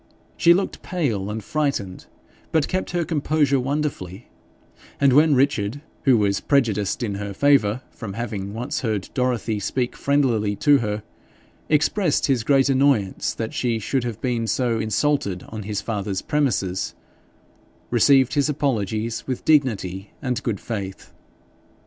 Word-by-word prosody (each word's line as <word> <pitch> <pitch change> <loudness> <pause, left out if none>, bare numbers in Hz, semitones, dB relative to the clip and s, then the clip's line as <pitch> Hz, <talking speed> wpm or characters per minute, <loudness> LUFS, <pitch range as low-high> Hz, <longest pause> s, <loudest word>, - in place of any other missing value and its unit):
She 170 0 +5
looked 195 +1 -2
pale 115 - -2
and 110 0 -4
frightened, 140 -10 -2 0.4
but 160 -3 +2
kept 185 0 -2
her 175 -1 -1
composure 150 -3 +1
wonderfully, 130 -8 -3 0.7
and 140 -2 +4
when 150 +1 +5
Richard, 130 -2 +1 0.2
who 130 -4 +6
was 100 -2 +1
prejudiced 115 -6 +1
in 105 -4 -2
her 100 -1 -5
favour 130 -3 +3
from 105 -5 -7
having 105 -3 -4
once 125 +8 -3
heard 110 -6 -2
Dorothy 120 -4 0
speak 125 +4 -2
friendlily 120 -8 +1
to 145 -2 +5
her, 105 -2 -3 0.7
expressed 155 +2 +2
his 130 -5 +1
great 135 +2 +3
annoyance 135 -8 +1
that 110 -1 -4
she 120 -2 0
should 125 +4 -1
have 115 -3 -4
been 120 -3 -1
so 120 -1 0
insulted 110 -4 0
on 110 -1 -6
his 105 0 -3
father's 100 -3 -3
premises, 105 -11 -1 1.0
received 130 +2 +4
his 145 +1 +2
apologies 115 -6 -1
with 130 -2 -4
dignity 105 - +1
and 125 -2 -2
good 115 -7 -2
faith. 100 -4 -6
120 Hz, 140 wpm, -23 LUFS, 105-140 Hz, 1.0 s, who